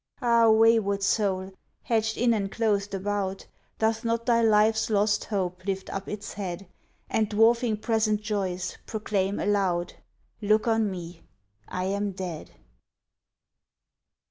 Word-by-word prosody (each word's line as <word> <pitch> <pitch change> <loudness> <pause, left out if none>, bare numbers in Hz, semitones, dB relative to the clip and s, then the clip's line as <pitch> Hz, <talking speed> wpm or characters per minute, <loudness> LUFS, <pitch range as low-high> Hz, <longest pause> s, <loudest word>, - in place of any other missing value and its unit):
Ah, 235 -3 +4
wayward 220 -3 +4
soul, 195 -2 0 0.3
hedged 220 -1 0
in 240 0 +3
and 200 -3 -2
clothed 205 -3 0
about, 195 0 -3 0.3
Doth 220 +1 0
not 230 0 -1
thy 235 -2 +3
life's 220 0 +3
lost 210 0 +1
hope 185 -3 -3
lift 195 -1 -3
up 195 0 -5
its 210 -1 -6
head, 195 -2 -5 0.4
And, 215 -2 0
dwarfing 225 +1 +3
present 215 -1 +1
joys, 190 -4 -3
proclaim 205 -3 -1
aloud, 190 -4 0 0.5
"Look 215 +2 +2
on 225 -2 +2
me, 175 -2 -8 0.5
I 185 - -3
am 200 +1 -1
dead!" 180 -4 -6
205 Hz, 125 wpm, -26 LUFS, 195-220 Hz, 0.5 s, Ah